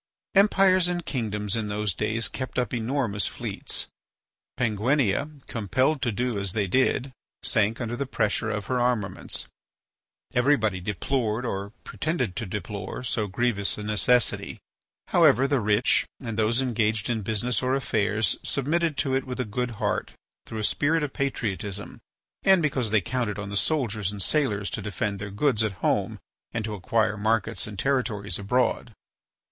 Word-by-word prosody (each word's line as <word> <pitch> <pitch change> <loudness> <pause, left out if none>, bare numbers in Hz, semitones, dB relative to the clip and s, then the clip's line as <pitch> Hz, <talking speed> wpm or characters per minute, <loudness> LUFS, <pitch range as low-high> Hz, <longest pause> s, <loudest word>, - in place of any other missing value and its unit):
Empires 195 -2 +5
and 175 -1 -2
kingdoms 105 -5 -1
in 110 -2 -1
those 105 -1 -1
days 110 +5 -1
kept 130 -1 -5
up 125 -1 0
enormous 115 -3 0
fleets. - - -4 0.7
Penguinia, 125 +5 +1
compelled 130 +7 0
to 120 - +1
do 120 0 -1
as 100 -2 -2
they 105 -2 +1
did, 130 +5 +1 0.3
sank 110 +1 +2
under 120 -1 -2
the 140 +2 -3
pressure 110 -2 0
of 105 -2 -2
her 130 -1 0
armaments. 120 -5 0 0.9
Everybody 120 -7 +2
deplored 110 +4 -1
or 100 -3 -3
pretended 130 - -2
to 115 - -3
deplore 100 +4 -5
so 110 -3 0
grievous 100 -1 0
a 105 - -5
necessity. 110 +3 +1 0.5
However, 130 +5 +5
the 140 -1 +2
rich, 105 +2 +3
and 115 -4 -5
those 110 +4 +2
engaged 110 -3 0
in 115 -3 0
business 110 +3 0
or 130 +1 +1
affairs, 110 -5 +1
submitted 155 +3 0
to 135 -3 0
it 135 - +1
with 125 0 -5
a 125 - 0
good 125 +4 -2
heart 105 -3 -1 0.3
through 110 - -6
a 110 - -2
spirit 155 +8 +2
of 145 - -3
patriotism, 105 -7 -3 0.4
and 190 -3 +5
because 130 -6 +1
they 105 -1 +3
counted 115 0 -2
on 100 -1 -5
the 100 - -4
soldiers 105 - 0
and 105 - -7
sailors 105 -3 +1
to - - -3
defend 100 0 -2
their 105 0 -5
goods 110 +2 +1
at 110 -2 0
home - - +1 0.4
and 110 -2 -2
to 110 - -4
acquire 105 +1 +1
markets 110 0 +1
and 105 -2 -8
territories 110 -8 0
abroad. 120 +2 0
115 Hz, 160 wpm, -26 LUFS, 105-130 Hz, 0.9 s, Empires